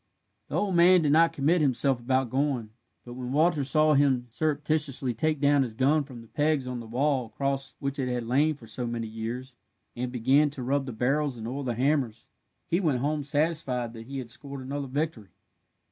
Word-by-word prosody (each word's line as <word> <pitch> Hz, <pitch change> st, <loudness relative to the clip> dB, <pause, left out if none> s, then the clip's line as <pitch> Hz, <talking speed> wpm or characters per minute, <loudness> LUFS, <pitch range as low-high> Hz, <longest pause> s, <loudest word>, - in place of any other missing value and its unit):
The -, -, -5 dB
old 200 Hz, -2 st, 0 dB
man 175 Hz, 0 st, +6 dB
did 145 Hz, -, +2 dB
not 165 Hz, +2 st, +5 dB
commit 155 Hz, +5 st, +2 dB
himself 135 Hz, -2 st, +2 dB
about 130 Hz, 0 st, 0 dB
going, 130 Hz, -5 st, -1 dB, 0.3 s
but 120 Hz, -, -8 dB
when 125 Hz, 0 st, -5 dB
Walter 155 Hz, 0 st, +3 dB
saw 155 Hz, +3 st, +3 dB
him 135 Hz, -3 st, +3 dB
surreptitiously 150 Hz, -2 st, 0 dB
take 155 Hz, +4 st, 0 dB
down 145 Hz, 0 st, +4 dB
his 120 Hz, -5 st, -3 dB
gun 140 Hz, +4 st, +2 dB
from 125 Hz, -4 st, -10 dB
the 115 Hz, -, -15 dB
pegs 150 Hz, 0 st, 0 dB
on 125 Hz, -1 st, -4 dB
the 115 Hz, -, -9 dB
wall 130 Hz, +1 st, 0 dB
across 135 Hz, +4 st, -2 dB
which 140 Hz, 0 st, -4 dB
it 130 Hz, -, 0 dB
had 120 Hz, -1 st, -2 dB
lain 145 Hz, +6 st, +2 dB
for 125 Hz, -, -15 dB
so 120 Hz, +2 st, -5 dB
many 115 Hz, -1 st, -3 dB
years, 115 Hz, +4 st, -6 dB, 0.4 s
and 125 Hz, +1 st, -3 dB
began 130 Hz, +5 st, +3 dB
to 140 Hz, -3 st, -7 dB
rub 135 Hz, +2 st, 0 dB
the -, -, -3 dB
barrels 135 Hz, +4 st, 0 dB
and 110 Hz, 0 st, -6 dB
oil 135 Hz, +4 st, -4 dB
the 120 Hz, -3 st, -2 dB
hammers, 130 Hz, -3 st, 0 dB, 0.3 s
he 170 Hz, -, +1 dB
went 155 Hz, -9 st, +1 dB
home 145 Hz, +4 st, -1 dB
satisfied 145 Hz, -5 st, -1 dB
that 115 Hz, 0 st, -10 dB
he 135 Hz, +1 st, -6 dB
had 125 Hz, -3 st, -6 dB
scored 140 Hz, +1 st, -8 dB
another 140 Hz, +1 st, -4 dB
victory. 135 Hz, -6 st, -3 dB
135 Hz, 205 wpm, -27 LUFS, 125-150 Hz, 0.4 s, man